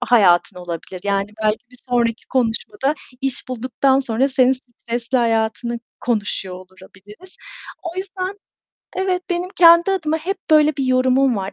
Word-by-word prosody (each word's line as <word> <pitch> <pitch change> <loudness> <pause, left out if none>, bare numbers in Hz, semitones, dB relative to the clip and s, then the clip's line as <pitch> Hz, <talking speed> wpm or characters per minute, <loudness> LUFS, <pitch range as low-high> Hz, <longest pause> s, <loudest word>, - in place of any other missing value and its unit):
hayatın 200 -7 +4
olabilir. 175 +1 -7
Yani 200 0 0
belki 215 +2 0
bir 250 - -18
sonraki 235 -2 0
konuşmada 265 - 0 0.3
iş 270 -2 -2
bulduktan 255 +2 +1
sonra 265 0 +1
senin 260 -1 +3
stresli 240 -1 -3
hayatını 230 0 0 0.2
konuşuyor 205 -5 -1
olabiliriz. 190 - -15 0.5
O 340 +1 -6
yüzden 380 +1 -4 0.6
evet, 370 -1 0
benim 355 +1 -1
kendi 340 +1 +7
adıma 320 -5 0
hep 375 +5 -3
böyle 305 -1 +5
bir 275 - -1
yorumum 255 0 +3
var: 195 0 -4
250 Hz, 135 wpm, -20 LUFS, 220-305 Hz, 0.6 s, kendi